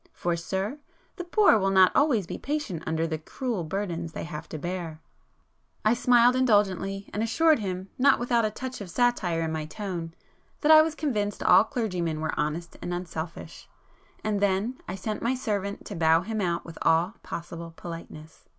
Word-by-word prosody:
For, 175 -1 -1
sir, 190 - -3 0.4
the 355 - -4
poor 355 - +4
will 195 0 +1
not 190 -1 +6
always 270 - +3
be - - -6
patient 285 - -3
under 160 0 0
the 160 -1 -3
cruel 225 - -3
burdens 170 -1 -3
they - - -5
have 160 -2 -7
to 155 - -5
bear." 170 -1 -5 0.9
I 215 - +5
smiled 245 0 +5
indulgently, 200 -5 +1
and 210 - -1
assured 310 +6 +3
him, 190 -2 -4
not 275 +1 +5
without 240 -1 +1
a 215 - +2
touch 255 +2 -6
of 195 - -7
satire 185 -6 +1
in 160 - -2
my 155 -1 -3
tone, 170 -2 -5 0.5
that 305 - +4
I 310 0 +10
was 315 0 -1
convinced 210 -11 -2
all 180 +2 +7
clergymen 180 - -2
were 155 0 -2
honest 160 +3 -3
and 175 - -4
unselfish,—and 175 +4 -7
then 205 +5 0
I 185 - -4
sent 210 +3 -4
my 245 +3 +1
servant 200 -5 -3
to 205 - -6
bow 165 0 +4
him 215 +3 -3
out 175 -2 -1
with 165 - -10
all 170 +7 +2
possible 170 0 -7
politeness. 165 -2 -9
195 Hz, 180 wpm, -27 LUFS, 170-235 Hz, 0.9 s, I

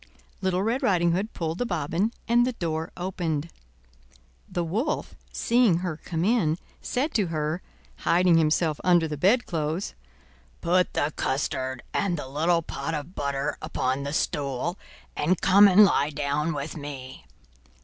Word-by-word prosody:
Little 190 0 +1
Red 230 +5 0
Riding 175 -3 +3
Hood 195 +6 -1
pulled 165 0 -3
the 245 - 0
bobbin 175 +4 0 0.2
and 240 +1 +4
the 255 - -1
door 160 -5 -3
opened. 170 -4 -2 1.0
The 175 - -1
wolf, 215 - -2 0.2
seeing 235 -7 +3
her 165 -3 -2
come 165 +2 -3
in, 195 -8 +2 0.2
said 280 +6 -1
to 205 -5 +2
her, 155 +1 -2 0.4
hiding 175 -1 +3
himself 155 0 +1
under 175 -3 +4
the 150 - -4
bedclothes: 175 - 0 0.7
"Put 180 +2 +2
the 145 +1 0
custard 130 -1 -2
and 185 -4 0
the 145 - -6
little 165 +5 +1
pot 150 +2 -4
of 150 +4 -6
butter 140 -1 -2
upon 135 -4 -1
the 140 0 -4
stool, 145 +2 -1 0.4
and 170 +4 +1
come 200 +2 +7
and 200 +2 +8
lie 145 -6 +2
down 150 +2 -1
with 145 +2 -4
me." 140 -4 -8
165 Hz, 150 wpm, -26 LUFS, 150-185 Hz, 1.0 s, and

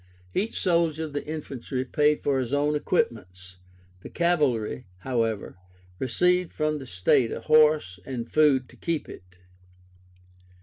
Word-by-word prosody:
Each 215 +4 -1
soldier 170 -3 +1
of 155 -2 -6
the 145 - -3
infantry 135 -4 -4
paid 150 +2 +2
for 140 -2 +1
his 130 0 -3
own 145 +1 +2
equipments; 90 - -2 0.4
the - - -9
cavalry, 135 - 0
however, 115 -5 -2 0.4
received 180 +8 +1
from 155 -1 -1
the 135 - -9
state 95 +5 +2
a - - -5
horse, 155 -11 +3
and 120 -1 -5
food 140 -4 +3
to - - -17
keep 165 -3 -3
it. 90 0 -13
145 Hz, 135 wpm, -26 LUFS, 115-155 Hz, 0.4 s, horse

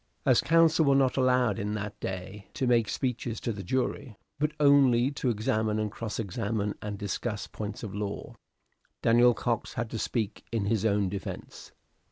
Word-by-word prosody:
As 130 -4 +5
counsel 165 0 +4
were 140 -1 +4
not 135 -2 +3
allowed 125 -4 +2
in 105 0 -2
that 105 -1 -5
day 95 +2 -6
to 130 - 0
make 120 -4 +3
speeches 125 -3 -2
to 115 - -2
the 100 - -6
jury, 125 +2 -2 0.2
but 150 +1 +1
only 135 -3 +5
to 135 -2 -1
examine 110 -1 0
and 105 -1 -1
cross 115 -1 -5
examine 105 0 -2
and 105 -1 -4
discuss 105 +2 -3
points 105 +1 -6
of 105 -3 -5
law, 100 0 -4 0.7
Daniel 120 +1 +5
Cox 120 -2 -2
had 115 0 -3
to 115 - -3
speak 110 -3 -2
in 110 -4 -1
his 110 0 0
own 100 -2 +2
defence. 100 +1 -7
115 Hz, 175 wpm, -28 LUFS, 105-125 Hz, 0.7 s, As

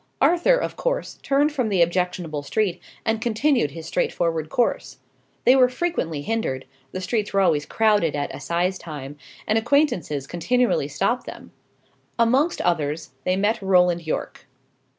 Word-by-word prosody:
Arthur, 350 +9 +4
of - - -3
course, - - -2
turned 285 +2 +2
from 255 -6 -1
the 185 -4 +4
objectionable 175 -3 -2
street, 180 +4 -1 0.2
and 225 0 0
continued 240 - +1
his 160 +3 -9
straightforward 165 -2 -1
course. 240 - -1 0.5
They 255 - +7
were 255 -2 +5
frequently 250 - -2
hindered; 180 -11 -2 0.3
the 185 - -5
streets 210 +2 -2
were 195 - +3
always 155 -6 +2
crowded 210 -8 +2
at 145 - -3
assize 180 +2 -1
time, 145 -3 -8 0.3
and 220 +1 +2
acquaintances 225 - +1
continually 205 - +1
stopped 150 - -1
them. - - -10 0.7
Amongst 260 +8 +2
others, 155 -3 -1
they 185 - +2
met 210 +3 +1
Roland 180 -3 +3
Yorke. 155 - -4
190 Hz, 145 wpm, -23 LUFS, 165-240 Hz, 0.7 s, They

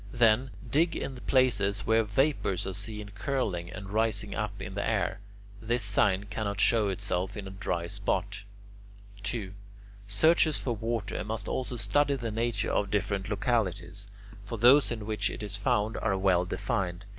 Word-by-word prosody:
Then, 120 +2 +4 0.2
dig 155 +8 +2
in 135 - -4
places 105 -7 +2
where 115 0 +4
vapours 105 - +1
are 95 - -3
seen 105 +1 -3
curling 100 -5 -2
and 100 +1 -8
rising 110 -1 0
up 105 -2 -3
into 95 -1 -6
the 100 - -1
air. 100 -3 0 0.4
This 120 +1 0
sign 100 -1 +3
cannot 100 -1 -3
show 110 -4 +3
itself 95 +1 -2
in 100 - -5
a - - -7
dry 90 -3 -2
spot. 100 +1 -2 0.8
2. 100 -3 -3 0.5
Searchers 155 +9 +4
for 120 -3 -2
water 115 -2 -2
must 110 0 -4
also 130 -1 -2
study 145 +4 +2
the 120 -4 -4
nature 115 0 -1
of 100 - +1
different 100 -1 -1
localities; 100 -4 -1 0.3
for 115 +3 -5
those 125 +6 +6
in 110 -3 -4
which 105 -2 0
it - - -6
is 100 -1 -2
found 105 +2 0
are 100 -3 0
well 95 -2 +3
defined. 95 -2 -2
105 Hz, 160 wpm, -29 LUFS, 100-115 Hz, 0.8 s, those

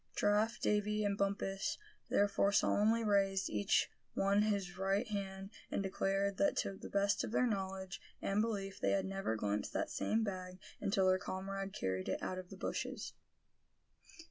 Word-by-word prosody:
Giraffe, 215 +3 +2
Davy, 210 0 +1
and 200 -1 +1
Bumpus 195 -1 -1 0.3
thereupon 200 0 +3
solemnly 220 +3 +3
raised, 195 -2 +2
each 105 -1 +2 0.3
one 200 +1 +3
his 200 -4 0
right 195 +5 +1
hand, 195 -1 -4 0.2
and 200 - -1
declared 195 +1 0
that 200 - +2
to - - 0
the - - -9
best 200 0 +2
of - - -3
their 250 - +3
knowledge 190 -4 -3 0.2
and 200 +2 +1
belief 200 -3 -2
they - - +2
had 195 -1 +1
never 195 -11 -1
glimpsed 105 -1 -1
that - - -1
same 225 +1 +1
bag 185 -3 -4 0.2
until 195 -1 +2
their 185 0 +4
comrade 195 +1 -4
carried 95 0 -2
it - - -2
out 185 - -2
of 180 -1 -9
the 195 - -9
bushes. - - -3
195 Hz, 165 wpm, -36 LUFS, 190-205 Hz, 0.3 s, their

